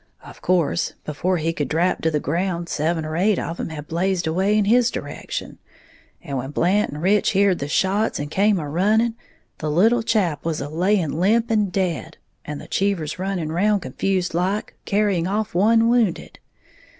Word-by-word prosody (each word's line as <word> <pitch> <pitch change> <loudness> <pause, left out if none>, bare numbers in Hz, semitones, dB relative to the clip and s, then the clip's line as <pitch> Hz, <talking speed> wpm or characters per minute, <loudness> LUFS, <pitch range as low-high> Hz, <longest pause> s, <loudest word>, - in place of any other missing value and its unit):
Of - - -13
course 175 -2 +1
before 180 +5 -1
he 165 +1 -1
could 145 -4 -2
drap 170 +6 0
to 160 - +2
the 150 -2 0
ground, 170 +3 -2
seven 160 +1 -1
or 155 0 -4
eight 195 +3 +2
of 165 +1 -4
'em - - -3
had 150 -2 -7
blazed 180 +2 0
away 190 +6 +1
in 210 - +2
his 240 +3 +4
direction; - - -6 0.6
and 140 -5 -3
when 135 +2 -5
Blant 185 +7 +1
and 150 +3 -7
Rich 200 +2 +3
heared 195 -2 +3
the 140 - -3
shots 195 +8 +1
and 145 +1 -5
come 205 +3 +3
a 155 -4 -4
running, 215 +9 +2 0.5
the 155 - -2
little 220 +10 +3
chap 200 - 0
was 165 -2 -2
a 140 - -4
laying 175 0 +1
limp 225 +5 +2
and 210 -4 +1
dead, 180 -4 -2 0.3
and 150 -1 -6
the - - -11
Cheevers 185 -5 -1
running 185 -4 -2
round 200 +4 +1
confused 180 +7 -1
like, 185 +5 -1
carrying 200 -4 +1
off 210 +2 -2
one 225 +5 +4
wounded. 235 -6 0
180 Hz, 185 wpm, -22 LUFS, 160-205 Hz, 0.6 s, his